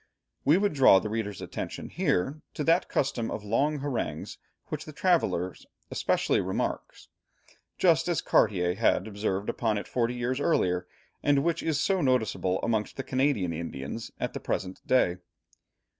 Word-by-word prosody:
We 150 Hz, +5 st, +5 dB
would 205 Hz, -1 st, +1 dB
draw 135 Hz, -8 st, +7 dB
the 105 Hz, +2 st, -2 dB
reader's 105 Hz, -3 st, -3 dB
attention -, -, -6 dB
here, 135 Hz, +12 st, 0 dB
to 150 Hz, -, -2 dB
that 165 Hz, +4 st, +3 dB
custom 125 Hz, -4 st, 0 dB
of 105 Hz, -, -5 dB
long 140 Hz, +9 st, +1 dB
harangues 125 Hz, -, -3 dB, 0.3 s
which -, -, -4 dB
the -, -, -9 dB
traveller 90 Hz, +1 st, +1 dB, 0.4 s
especially -, -, +1 dB
remarks, -, -, -3 dB, 0.7 s
just -, -, +3 dB
as -, -, +1 dB
Cartier 90 Hz, -3 st, +2 dB
had 100 Hz, -1 st, +2 dB
observed 100 Hz, -1 st, -2 dB
upon 110 Hz, -3 st, 0 dB
it 100 Hz, -, -5 dB
forty 120 Hz, 0 st, 0 dB
years 125 Hz, +2 st, -1 dB
earlier, 90 Hz, -, +1 dB, 0.3 s
and 140 Hz, -1 st, +3 dB
which 170 Hz, 0 st, 0 dB
is 155 Hz, -3 st, 0 dB
so 190 Hz, +3 st, +1 dB
noticeable 110 Hz, -, +1 dB
amongst 110 Hz, -2 st, -1 dB
the 135 Hz, -, -3 dB
Canadian 130 Hz, -, +1 dB
Indians 80 Hz, +4 st, -5 dB
at -, -, -2 dB
the -, -, -4 dB
present 95 Hz, 0 st, -3 dB
day. 110 Hz, -9 st, +3 dB
115 Hz, 155 wpm, -28 LUFS, 95-140 Hz, 0.7 s, draw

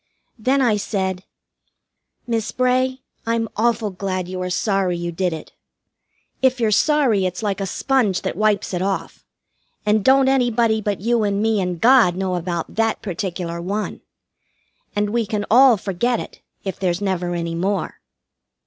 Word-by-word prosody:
Then 265 Hz, +4 st, +2 dB
I 220 Hz, -4 st, +3 dB
said: 190 Hz, -2 st, -2 dB, 1.0 s
"Miss 230 Hz, -3 st, -2 dB
Bray, 255 Hz, +1 st, +1 dB, 0.2 s
I'm 230 Hz, 0 st, 0 dB
awful 225 Hz, -1 st, +1 dB
glad 185 Hz, -1 st, -3 dB
you 185 Hz, 0 st, -5 dB
are 180 Hz, -, -2 dB
sorry 190 Hz, -1 st, 0 dB
you 170 Hz, 0 st, -3 dB
did 180 Hz, +1 st, -1 dB
it. 160 Hz, -, -7 dB, 0.9 s
If 260 Hz, -1 st, +3 dB
you're 225 Hz, -2 st, +2 dB
sorry 235 Hz, -5 st, +3 dB
it's 180 Hz, +4 st, -5 dB
like 200 Hz, -1 st, -1 dB
a 195 Hz, -, -2 dB
sponge 240 Hz, -3 st, 0 dB
that -, -, -2 dB
wipes 210 Hz, 0 st, +1 dB
it 180 Hz, -, -1 dB
off, 195 Hz, 0 st, -3 dB, 0.6 s
and 210 Hz, 0 st, +2 dB
don't 265 Hz, +2 st, +5 dB
anybody 240 Hz, -4 st, +2 dB
but 205 Hz, -2 st, -2 dB
you 235 Hz, +1 st, +1 dB
and 200 Hz, -1 st, 0 dB
me 220 Hz, -1 st, +1 dB
and 180 Hz, -2 st, -3 dB
God 235 Hz, -6 st, +5 dB
know 190 Hz, 0 st, -2 dB
about 175 Hz, -1 st, -3 dB
that 225 Hz, 0 st, 0 dB
particular 175 Hz, -3 st, -4 dB
one. 205 Hz, +4 st, -3 dB, 0.9 s
And 205 Hz, 0 st, 0 dB
we 230 Hz, -1 st, 0 dB
can 210 Hz, -1 st, -2 dB
all 250 Hz, 0 st, +7 dB
forget 210 Hz, +5 st, -1 dB
it, -, -, -9 dB, 0.2 s
if 190 Hz, -, -5 dB
there's 180 Hz, -2 st, 0 dB
never 180 Hz, -3 st, -1 dB
any 170 Hz, -1 st, -3 dB
more." 190 Hz, +2 st, -2 dB
205 Hz, 160 wpm, -21 LUFS, 185-230 Hz, 1.0 s, all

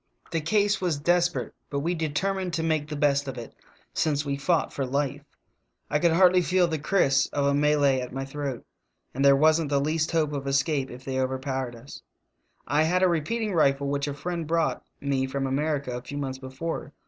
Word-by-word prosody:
The 165 Hz, -1 st, 0 dB
case 205 Hz, +4 st, +1 dB
was 170 Hz, -6 st, 0 dB
desper 175 Hz, +2 st, +2 dB
ate, -, -, -17 dB, 0.2 s
but 140 Hz, -1 st, -2 dB
we 170 Hz, +4 st, 0 dB
determined 180 Hz, +4 st, -1 dB
to 165 Hz, -1 st, -1 dB
make 155 Hz, -2 st, 0 dB
the 150 Hz, -, -5 dB
best 145 Hz, -1 st, +2 dB
of 135 Hz, -1 st, -5 dB
it, 115 Hz, -2 st, -8 dB, 0.4 s
since 150 Hz, -2 st, 0 dB
we 140 Hz, -1 st, -1 dB
fought 160 Hz, +4 st, 0 dB
for 140 Hz, -, -2 dB
life. 140 Hz, +2 st, -1 dB, 0.7 s
I 150 Hz, -, +2 dB
could 170 Hz, -, +4 dB
already 180 Hz, +2 st, +5 dB
feel 180 Hz, 0 st, +2 dB
the 160 Hz, -2 st, -2 dB
kriss 140 Hz, -4 st, +2 dB
of 140 Hz, -1 st, 0 dB
a 140 Hz, -, +3 dB
Malay 145 Hz, -2 st, +3 dB
at 125 Hz, -, -6 dB
my 135 Hz, +1 st, -4 dB
throat, 135 Hz, -3 st, -5 dB, 0.5 s
and 135 Hz, -, -1 dB
there 140 Hz, 0 st, +7 dB
wasn't 155 Hz, +1 st, +3 dB
the 140 Hz, -1 st, +2 dB
least 155 Hz, +2 st, 0 dB
hope 155 Hz, -3 st, +1 dB
of 140 Hz, -1 st, -4 dB
escape 140 Hz, 0 st, +1 dB
if 125 Hz, +2 st, -11 dB
they 130 Hz, -1 st, -2 dB
overpowered 130 Hz, -1 st, -2 dB
us. 120 Hz, +5 st, -11 dB, 0.6 s
"I 150 Hz, -, +2 dB
had 180 Hz, +4 st, +2 dB
^ -, -, +6 dB
repeating 195 Hz, +6 st, -1 dB
rifle 140 Hz, -4 st, +2 dB
which 140 Hz, 0 st, -1 dB
a 145 Hz, -, -3 dB
friend 170 Hz, +1 st, -4 dB
brought 165 Hz, +1 st, 0 dB, 0.2 s
me 135 Hz, -2 st, 0 dB
from 135 Hz, +1 st, -2 dB
America 140 Hz, -1 st, -1 dB
a 125 Hz, -, -5 dB
few 140 Hz, +4 st, -7 dB
months 135 Hz, -2 st, -4 dB
before. 130 Hz, +5 st, -5 dB
145 Hz, 205 wpm, -26 LUFS, 135-165 Hz, 0.7 s, there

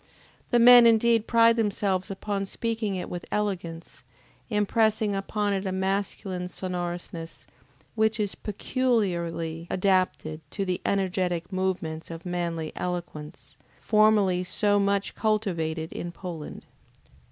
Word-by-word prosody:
The 240 Hz, -, +3 dB
men 240 Hz, 0 st, +9 dB
indeed 230 Hz, 0 st, +4 dB
pride 230 Hz, 0 st, +5 dB
themselves 200 Hz, -4 st, 0 dB
upon 195 Hz, 0 st, -3 dB
speaking 225 Hz, -2 st, -2 dB
it 180 Hz, -, -4 dB
with 175 Hz, 0 st, -6 dB
elegance, 175 Hz, -5 st, -3 dB, 0.5 s
impressing 215 Hz, 0 st, +1 dB
upon 205 Hz, +1 st, -1 dB
it 195 Hz, 0 st, -2 dB
a -, -, -1 dB
masculine 190 Hz, -1 st, -2 dB
sonorousness, 175 Hz, -2 st, -5 dB, 0.5 s
which 220 Hz, 0 st, +1 dB
is 205 Hz, -2 st, 0 dB
peculiarly 175 Hz, -8 st, -1 dB
adapted 185 Hz, -5 st, 0 dB
to 195 Hz, +4 st, -3 dB
the 180 Hz, -1 st, -2 dB
energetic 185 Hz, -2 st, -1 dB
movements 180 Hz, -4 st, -2 dB
of 165 Hz, +1 st, -8 dB
manly 170 Hz, -3 st, -3 dB
eloquence, 175 Hz, -4 st, -6 dB, 0.2 s
formerly 210 Hz, -4 st, +3 dB
so 205 Hz, +2 st, +1 dB
much 200 Hz, 0 st, 0 dB
cultivated 170 Hz, -7 st, -1 dB
in 175 Hz, -, -5 dB
Poland. 170 Hz, -4 st, -8 dB
190 Hz, 115 wpm, -26 LUFS, 175-210 Hz, 0.5 s, men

